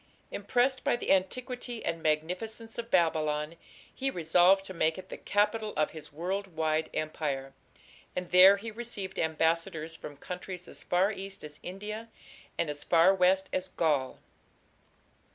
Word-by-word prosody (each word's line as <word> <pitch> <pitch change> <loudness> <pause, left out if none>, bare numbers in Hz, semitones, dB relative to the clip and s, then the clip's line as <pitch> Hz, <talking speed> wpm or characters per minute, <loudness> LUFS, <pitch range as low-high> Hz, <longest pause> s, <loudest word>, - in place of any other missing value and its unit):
Impressed 245 +6 +1
by - - +3
the 240 - -1
antiquity 245 +5 -1
and 165 0 -2
magnificence 180 +9 -2
of 230 0 -5
Babylon, 155 -3 +1 0.4
he 270 0 -1
resolved 180 0 +4
to 190 - -7
make 160 -1 +1
it 185 0 -9
the - - -6
capital 210 +1 +1
of 155 - +2
his 155 -2 -10
world 185 +6 -3
wide 155 0 0
empire, 140 -3 -3 0.6
and 180 -1 -4
there 190 +2 +9
he 220 +3 -6
received 215 -4 -5
ambassadors 160 0 0
from 145 -3 -9
countries 180 +2 -7
as - - -9
far 185 +3 +2
east 195 -1 -6
as 150 -1 -8
India 210 +5 -6 0.5
and - - +1
as 145 0 -4
far 170 +3 +5
west 190 +1 +3
as 185 - -1
Gaul. 145 -6 0
180 Hz, 150 wpm, -30 LUFS, 160-205 Hz, 0.6 s, there